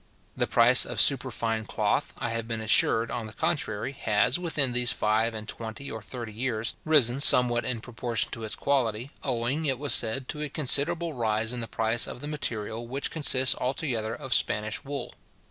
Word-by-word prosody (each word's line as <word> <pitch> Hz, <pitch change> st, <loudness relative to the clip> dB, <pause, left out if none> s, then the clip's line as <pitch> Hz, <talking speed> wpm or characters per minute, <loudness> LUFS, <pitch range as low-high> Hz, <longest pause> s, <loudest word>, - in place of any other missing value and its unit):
The -, -, 0 dB
price -, -, +5 dB
of -, -, -5 dB
superfine 110 Hz, -1 st, +1 dB
cloth, -, -, -1 dB
I 115 Hz, -, -3 dB
have 115 Hz, 0 st, -3 dB
been 115 Hz, -1 st, -3 dB
assured, 115 Hz, +1 st, +2 dB
on 115 Hz, -2 st, -4 dB
the 110 Hz, -, -10 dB
contrary, 135 Hz, -8 st, -2 dB
has, 125 Hz, +3 st, +1 dB
within 150 Hz, -7 st, +1 dB
these 125 Hz, 0 st, +3 dB
five 110 Hz, +2 st, 0 dB
and 110 Hz, 0 st, -7 dB
twenty 115 Hz, +5 st, -8 dB
or 110 Hz, -, -7 dB
thirty 115 Hz, -1 st, -8 dB
years, 115 Hz, -1 st, -3 dB
risen 140 Hz, -5 st, +3 dB
somewhat 120 Hz, -3 st, +5 dB
in 120 Hz, -3 st, -3 dB
proportion 120 Hz, -1 st, -2 dB
to 115 Hz, -, -6 dB
its 110 Hz, -, -5 dB
quality, 125 Hz, -2 st, -1 dB
owing, 130 Hz, +4 st, -2 dB
it 135 Hz, -2 st, +1 dB
was 140 Hz, -2 st, +3 dB
said, 120 Hz, +3 st, +3 dB
to 150 Hz, -, -5 dB
a 150 Hz, -, -3 dB
considerable 160 Hz, +4 st, +2 dB
rise 110 Hz, -2 st, -1 dB
in 125 Hz, -, -4 dB
the 115 Hz, -, -4 dB
price 115 Hz, +2 st, +1 dB
of -, -, -8 dB
the 145 Hz, -, -7 dB
material, 115 Hz, -6 st, -5 dB
which 135 Hz, +3 st, -4 dB
consists 135 Hz, -4 st, +3 dB
altogether 125 Hz, -4 st, -2 dB
of 135 Hz, -4 st, -3 dB
Spanish 105 Hz, 0 st, 0 dB
wool. 140 Hz, 0 st, -6 dB
120 Hz, 185 wpm, -26 LUFS, 110-140 Hz, -, price